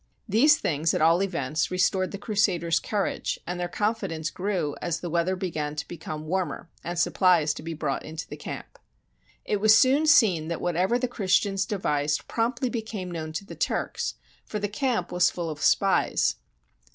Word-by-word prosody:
These 270 +9 +5
things, 155 +1 0
at - - 0
all 165 +3 +5
events, 155 -6 -1
restored 185 +1 +1
the 200 - -6
Crusaders' 190 -6 +1
cour 205 -2 -1
age, - - -3
and 180 0 -4
their 175 - -1
confidence 180 -4 -2
grew 180 -7 -2
as 170 -1 -2
the 175 - -5
weather 170 +2 +1
be 185 -1 -3
gan 150 -1 -3
to 150 - -4
become 155 -2 -7
warmer 175 0 -3
and 175 +1 -4
supplies 175 -3 +3
to - - -8
be 165 +1 -5
brought 145 -3 -2
into 160 +2 -7
the - - -7
camp. - - -8 0.7
It 205 -1 -1
was 215 +1 +7
soon 280 +5 +4
seen 190 - +5
that 170 0 -3
whatever 180 +6 +1
the 250 0 -1
Christians 195 -3 +1
de 205 - -2
vised 150 -4 0
promptly 240 +3 0
became 220 -6 -4
known 160 -2 -5
to 200 - -4
the - - -9
Turks, - - -2 0.3
for 215 - -5
the 205 0 -1
camp 220 -3 -1
was 180 -1 +4
full 170 -2 -4
of 150 0 -8
spies. - - +2
180 Hz, 190 wpm, -26 LUFS, 160-210 Hz, 0.7 s, was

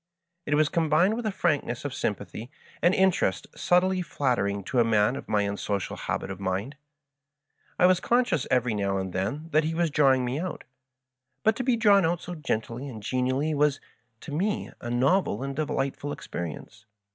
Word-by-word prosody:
It 145 - +2
Was 155 0 +4
combined 165 +4 +2
with 235 -1 -3
a - - 0
frankness 145 -9 -1
of 145 - -3
sympathy 105 0 -4 0.3
and 175 +2 +4
interest 185 - +2
subtly 185 +1 +2
flattering 120 - -1
to 125 - -1
a - - +6
man 110 +1 +2
of - - -8
my 105 -1 +2
unsocial 100 -1 -2
habit 95 - -3
of 95 - -7
mind. 100 +8 -2 1.0
I 180 - +5
was 185 0 +5
conscious 240 - +1
every 125 -2 +2
now 100 -2 0
and 95 -1 -4
then 115 - -3
that 155 +1 +4
he 160 +1 -2
was 170 -2 +1
drawing 135 -4 +4
me 125 +4 -2
out; 180 +1 -5 0.8
but 220 0 +4
to 255 - -2
be 250 -1 +2
drawn 205 -4 +5
out 165 +1 +1
so 180 - -7
gently 130 -3 -3
and 110 -5 -9
genially 130 +6 0
was, 145 -1 +2 0.4
to 150 - -9
me, 195 +8 -1
a 120 - -5
novel 135 +6 +1
and 140 0 -4
de%htf 140 -3 -2
ul 145 0 -3
easperience. 85 +5 -7
140 Hz, 180 wpm, -27 LUFS, 110-175 Hz, 1.0 s, a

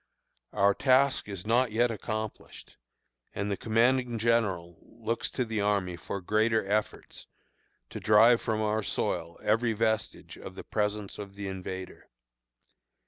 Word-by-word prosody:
Our 100 +1 +3
task 135 -1 +3
is 95 -1 -6
not 120 +2 +2
yet 120 +2 +2
accomplished, 110 0 -6 0.6
and 100 +1 -2
the - - +1
commanding 120 +3 +1
general 100 -7 0
looks 115 0 -4
to 125 - -2
the 110 -2 -2
army 100 -3 0
for 95 +3 -6
greater 110 +3 +1
efforts, 105 +2 -3 0.6
to - - -6
drive 115 +3 +5
from 110 -1 -1
our 110 +1 0
soil 85 -4 -3
every 115 +2 +2
vestige 110 0 -2
of - - -9
the - - -8
presence 105 -1 -2
of 100 -1 -8
the 100 -1 -5
invader. 95 -1 -7
110 Hz, 140 wpm, -29 LUFS, 100-115 Hz, 0.6 s, drive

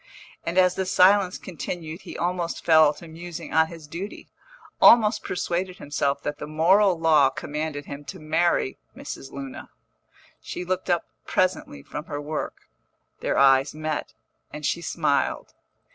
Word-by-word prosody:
And 170 +2 -3
as 180 -1 +5
the 190 0 -2
silence 185 0 +4
continued 170 -1 -6
he - - -9
almost 175 -1 -2
fell 160 -2 +6
to 170 - -12
musing 165 0 -8
on 160 0 +4
his 165 -2 -11
duty, 180 +7 -7 0.5
almost 220 -2 +6
persuaded 180 +1 -2
himself 140 -1 -1
that 145 0 -4
the - - -6
moral 175 +4 +3
law 155 -4 +5
commanded 145 +1 -4
him 140 +1 -8
to - - -8
marry 155 - +1 0.2
Mrs. 135 - -8
Luna. 135 -1 -8 0.7
She 180 - -6
looked 185 +1 -2
up 175 -1 +2 0.2
presently 185 - -1
from 150 - -7
her 145 -2 -5
work, 150 +1 -5 0.5
their - - -1
eyes 135 +1 +4
met, 155 0 -4 0.4
and 150 -1 -6
she 170 - 0
smiled. 155 -4 -1
160 Hz, 145 wpm, -25 LUFS, 150-180 Hz, 0.7 s, fell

